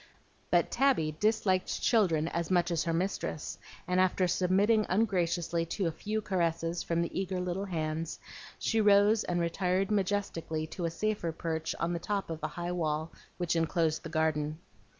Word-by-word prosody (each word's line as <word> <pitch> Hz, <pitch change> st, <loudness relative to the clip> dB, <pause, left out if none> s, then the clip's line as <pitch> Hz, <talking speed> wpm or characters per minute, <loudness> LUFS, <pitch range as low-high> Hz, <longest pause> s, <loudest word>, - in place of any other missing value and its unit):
But -, -, +3 dB
Tabby 235 Hz, -, +2 dB
disliked 210 Hz, -4 st, +1 dB
children 170 Hz, -9 st, +3 dB
as 170 Hz, -1 st, -2 dB
much 175 Hz, -1 st, +2 dB
as 170 Hz, 0 st, 0 dB
her 165 Hz, -, 0 dB
mistress, 165 Hz, -3 st, -2 dB, 0.3 s
and 180 Hz, 0 st, +2 dB
after 185 Hz, 0 st, +3 dB
submitting 195 Hz, +5 st, +3 dB
ungraciously 175 Hz, -4 st, +1 dB
to 195 Hz, -, 0 dB
a 165 Hz, -, +1 dB
few 215 Hz, +6 st, -3 dB
caresses 170 Hz, -3 st, 0 dB
from 170 Hz, 0 st, 0 dB
the 170 Hz, -, -2 dB
eager 190 Hz, -1 st, -2 dB
little 180 Hz, +2 st, -2 dB
hands, 160 Hz, -2 st, -3 dB, 0.4 s
she 225 Hz, -1 st, +1 dB
rose 205 Hz, +1 st, +5 dB
and 175 Hz, -1 st, -1 dB
retired 180 Hz, +3 st, 0 dB
majestically 190 Hz, -6 st, -1 dB
to 170 Hz, +2 st, -5 dB
a -, -, +1 dB
safer 205 Hz, -1 st, -1 dB
perch 160 Hz, 0 st, -3 dB
on 170 Hz, +1 st, 0 dB
the 170 Hz, -, -2 dB
top 200 Hz, 0 st, -2 dB
of 160 Hz, -, -5 dB
the 155 Hz, -, -1 dB
high 175 Hz, +3 st, -4 dB
wall 160 Hz, -2 st, -1 dB, 0.3 s
which 175 Hz, -1 st, 0 dB
enclosed 165 Hz, -1 st, +1 dB
the 165 Hz, -, -7 dB
garden. 155 Hz, -1 st, 0 dB
175 Hz, 170 wpm, -30 LUFS, 165-195 Hz, 0.4 s, rose